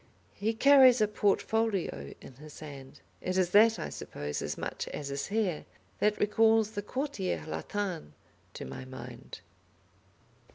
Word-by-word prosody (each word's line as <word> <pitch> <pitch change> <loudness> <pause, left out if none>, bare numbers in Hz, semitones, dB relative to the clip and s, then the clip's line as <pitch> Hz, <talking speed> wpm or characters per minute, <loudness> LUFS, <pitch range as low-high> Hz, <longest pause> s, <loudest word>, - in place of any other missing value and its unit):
He 220 +2 -1
carries 260 0 +7
a 215 - +4
portfolio 205 - 0
in - - -12
his 150 +1 -12
hand. 140 -3 -10 0.2
It 185 +1 -2
is 180 -2 +2
that, 220 +3 +6
I - - -4
suppose, 75 0 -5
as - - -4
much - - -4
as 140 - -5
his 140 0 -3
hair, 200 -6 -1 0.3
that 210 0 +2
recalls 220 +1 +3
the 205 -2 -4
Quartier 255 -4 -3
Latin 180 - -4 0.4
to - - -6
my 65 0 -7
mind. 65 - -10
205 Hz, 140 wpm, -30 LUFS, 150-220 Hz, 0.4 s, carries